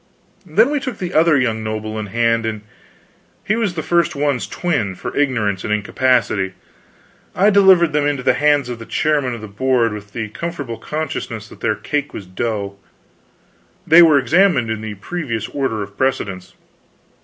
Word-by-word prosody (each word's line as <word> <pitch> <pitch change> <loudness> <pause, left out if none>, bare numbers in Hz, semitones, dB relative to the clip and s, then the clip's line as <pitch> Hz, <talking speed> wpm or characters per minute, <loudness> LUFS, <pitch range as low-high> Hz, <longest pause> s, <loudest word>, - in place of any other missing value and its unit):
Then 220 - +3
we 295 - +1
took 255 -5 -5
the 180 -2 -5
other 160 -1 +4
young 115 -4 0
noble 110 0 -4
in 105 - -4
hand, 115 +2 +1
and 110 -1 -3 0.8
he 215 - 0
was 215 -6 -1
the 160 - -3
first 170 -3 +1
one's 140 -3 0
twin, 125 - -2
for - - -6
ignorance 115 -10 0
and - - -3
incapacity. 105 -2 +1 0.8
I 200 +3 +4
delivered 190 -5 +5
them 145 -1 +2
into 140 -3 -1
the - - +4
hands 145 -3 +2
of 120 -2 -6
the 115 - -10
chairman 145 -5 0
of 115 - -9
the 110 - -7
Board 115 +2 +1
with 105 0 -9
the 110 -2 -4
comfortable 140 -3 -5
consciousness 140 -8 -4
that - - -14
their 110 -2 0
cake 145 +7 -3
was 100 - -7
dough. 100 +1 -4 1.1
They 170 0 +8
were 160 -4 +6
examined 140 - +3
in 110 -1 -3
the 110 -1 -6
previous 115 - -4
order 120 -7 -2
of 100 0 -11
precedence. 100 -8 -2
125 Hz, 175 wpm, -19 LUFS, 110-155 Hz, 1.1 s, They